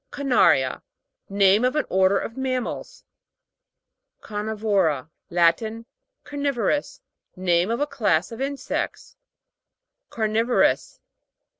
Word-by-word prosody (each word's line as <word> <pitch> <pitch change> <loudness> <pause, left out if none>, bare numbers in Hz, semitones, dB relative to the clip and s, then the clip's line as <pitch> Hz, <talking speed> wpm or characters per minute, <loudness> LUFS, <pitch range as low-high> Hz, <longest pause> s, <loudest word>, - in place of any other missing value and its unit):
CARNA'RIA. 245 - +2 0.5
Name 200 +2 +4
of 255 +3 +1
an 300 - +1
order 190 +1 +3
of 230 - -4
mammals, 255 -2 -4 1.2
CARNI'VORA. 205 -9 -1 0.2
Latin. 180 +7 +1 0.4
Carni'vorous. 285 - -2 0.3
Name 180 0 +1
of 230 - -1
a - - +3
class 220 - 0
of 230 - -7
insects. 275 0 -4 0.9
CARNI'VOROUS. 225 +2 +1
220 Hz, 90 wpm, -24 LUFS, 190-255 Hz, 1.2 s, Name